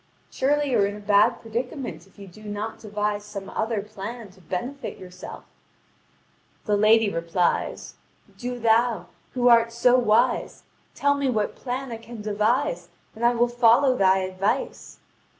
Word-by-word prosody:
Surely 290 +1 +1
you 235 - +3
are 200 - +4
in 205 - -5
a - - -9
bad 205 0 +3
predicament 240 - -5
if 195 - -26
you 200 - -10
do 190 +4 -15
not 210 +1 -5
devise 210 -1 -2
some 200 -2 -8
other 220 -2 -2
plan 215 +1 -8
to 185 0 -21
benefit 240 - -5
yourself." 180 -1 -10 1.2
The 210 - +2
lady 215 +2 +5
replies: 170 -1 -1 0.4
"Do 245 0 -5
thou, 225 -4 +2 0.3
who 245 -1 +2
art 230 -1 +5
so 245 +2 +4
wise, 235 +1 +1 0.3
tell 285 0 +2
me 280 -1 -1
what 215 -4 0
plan 255 0 -5
I 230 - -4
can 230 0 -11
devise, 215 - 0 0.3
and 225 - -7
I 240 +1 +4
will 240 +1 +3
follow 245 +2 +4
thy 190 -3 +3
advice." 190 - -3
225 Hz, 155 wpm, -24 LUFS, 205-245 Hz, 1.2 s, lady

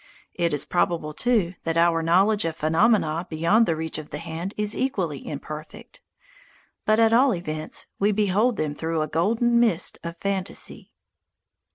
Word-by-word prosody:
It 170 -1 0
is 145 -1 0
probable, 165 -3 0
too, 215 -4 +1
that 165 0 -1
our 165 -1 +3
knowledge 195 +6 +3
of 165 -1 -2
phenomena 165 0 +2
beyond 170 +8 +3
the 165 - +1
reach 160 0 -3
of 155 - -10
the 150 - -5
hand 165 +4 -6
is 210 0 -1
equally 180 - -2
imperfect. 150 +1 -8 0.9
But, 215 +1 +4
at 225 0 +4
all 250 -1 +4
events, 155 -3 -4
we 205 +2 +3
behold 210 +3 +2
them 150 -1 -1
through 160 +1 -2
a - - -3
golden 230 - +2
mist 220 -8 +1
of 170 0 -6
fantasy. 195 0 -4
170 Hz, 160 wpm, -24 LUFS, 160-210 Hz, 0.9 s, But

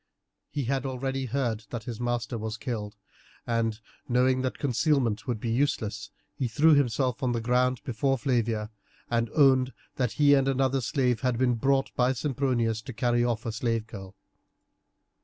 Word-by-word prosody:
He 145 - -3
had 135 +1 -1
already 135 0 -2
heard 120 -4 -2
that 120 -2 -5
his 115 -1 -6
master 120 -1 -2
was 110 0 -4
killed, 105 -4 -4 0.5
and, 115 -2 0 0.3
knowing 130 +1 +3
that 130 -1 -2
concealment 135 -3 +1
would 120 -4 -1
be 115 +1 -2
useless, 110 -5 -1 0.2
he 130 - -2
threw 155 +7 +4
himself 130 -1 +1
on 125 -2 +1
the 115 - 0
ground 125 +2 +1
before 135 +3 0
Flavia, 115 -4 -1 0.4
and 115 -1 +1
owned 130 -3 +4 0.2
that 125 -3 0
he 145 -1 +5
and 135 -1 +3
another 135 0 +1
slave 125 -1 0
had 125 -3 0
been 125 0 +2
brought 135 +3 +1
by 125 +1 +2
Sempronius 125 -5 0
to 130 +2 -8
carry 120 0 +1
off 120 -2 -1
a 115 - -1
slave 115 0 -1
girl. 95 -4 -10
125 Hz, 165 wpm, -27 LUFS, 115-135 Hz, 0.5 s, he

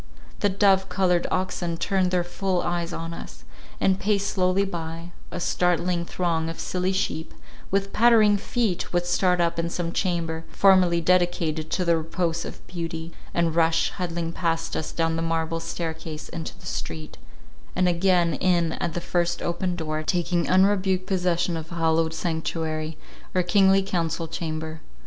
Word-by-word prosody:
The 205 - +2
dove 195 -1 +3
coloured 180 -1 +2
oxen 180 -2 -1
turned 190 +1 +1
their 180 -1 +1
full 180 +1 -1
eyes 175 0 -1
on 165 0 -4
us, - - -10 0.4
and 190 0 +2
paced 200 -1 +1
slowly 185 +1 +2
by; 165 -1 -5 0.2
a - - -5
startling 175 0 +1
throng 165 -2 -1
of 165 - -7
silly 185 +1 -1
sheep, 165 -4 -2 0.3
with 195 0 0
pattering 220 -3 +6
feet, 215 -3 -1
would 175 0 +1
start 180 0 +2
up 170 -1 +1
in 165 0 0
some 170 -1 -2
chamber, 165 -3 -1
formerly 185 -3 +4
dedicated 170 -3 +1
to 180 - 0
the 170 -1 +4
repose 165 +1 -1
of - - -9
beauty, 165 -1 -5 0.2
and 170 -2 +1
rush, 165 0 +3
huddling 170 -2 -3
past 165 -2 -1
us, 160 - -3
down 165 -1 0
the - - -1
marble 165 0 -1
staircase 160 -2 -5
into 165 -1 -6
the - - -16
street, 80 -3 -5 0.6
and 185 - +3
again 175 -1 +3
in 170 +1 +2
at 170 - -3
the 175 - -2
first 175 0 0
open 175 +1 -1
door, 155 -2 -2
taking 175 +1 0
unrebuked 190 0 +3
possession 180 -2 0
of 160 0 -6
hallowed 160 -1 +1
sanctuary, 160 -2 -2 0.4
or 180 - +3
kingly 195 +1 +4
council 170 -3 -1
chamber. 160 -1 -4
175 Hz, 160 wpm, -25 LUFS, 165-185 Hz, 0.6 s, pattering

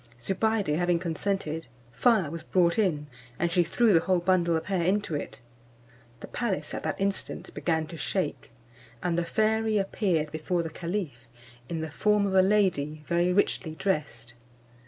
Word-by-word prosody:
Zobeide 195 - 0
having 175 +1 +2
consented, 165 -1 -2 0.2
fire 190 - +3
was 165 0 -5
brought 175 +2 +2
in, 160 -8 +1 0.3
and 170 0 0
she 175 +1 +4
threw 215 +6 +3
the 165 - +6
whole 185 +2 +1
bundle 175 -1 +2
of 160 - -5
hair 190 -3 0
into 190 0 0
it. 145 - -4 0.8
The - - -6
palace 235 -6 -2
at - - -3
that - - -3
instant 195 0 -3
began 160 -2 0
to 165 +1 -9
shake, 180 -2 -2 0.5
and 175 -1 +1
the 170 - +1
fairy 220 +2 +1
appeared 185 -6 0
before 170 +2 -1
the 165 - -5
caliph 170 - -4 0.4
in 165 -2 -3
the 160 -1 -4
form 210 +4 +2
of 195 - -1
a 190 - +6
lady 180 -7 +1
very 175 +1 +2
richly 180 -4 +1
dressed. 145 - -2
175 Hz, 165 wpm, -28 LUFS, 160-195 Hz, 0.8 s, the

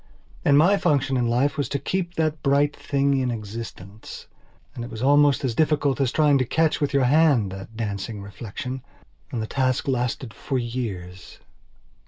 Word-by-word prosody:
And 140 -1 +5
my 180 +7 +5
function 140 -6 +1
in 120 -2 +1
life 130 +5 +1
was 145 - -1
to 140 - -1
keep 175 +5 -3
that 155 -2 0
bright 140 +1 +2
thing 140 -1 0
in 130 -1 0
existence. 110 -2 -7 0.5
And 120 - -6
it 120 - -7
was 110 +2 -6
almost 145 0 +4
as 125 - 0
difficult 145 -1 +1
as 130 -3 +1
trying 150 -3 +3
to - - +3
catch 160 +6 +1
with 145 -1 +1
your 140 -1 +2
hand 135 -7 +3
that 95 +3 -9
dancing 105 0 -4
reflection. 115 +5 -6 0.5
And 115 -3 -2
the - - -2
task 130 +2 0
lasted 125 -2 -2
for 135 - -3
years. 105 -7 -5
130 Hz, 175 wpm, -24 LUFS, 115-145 Hz, 0.5 s, And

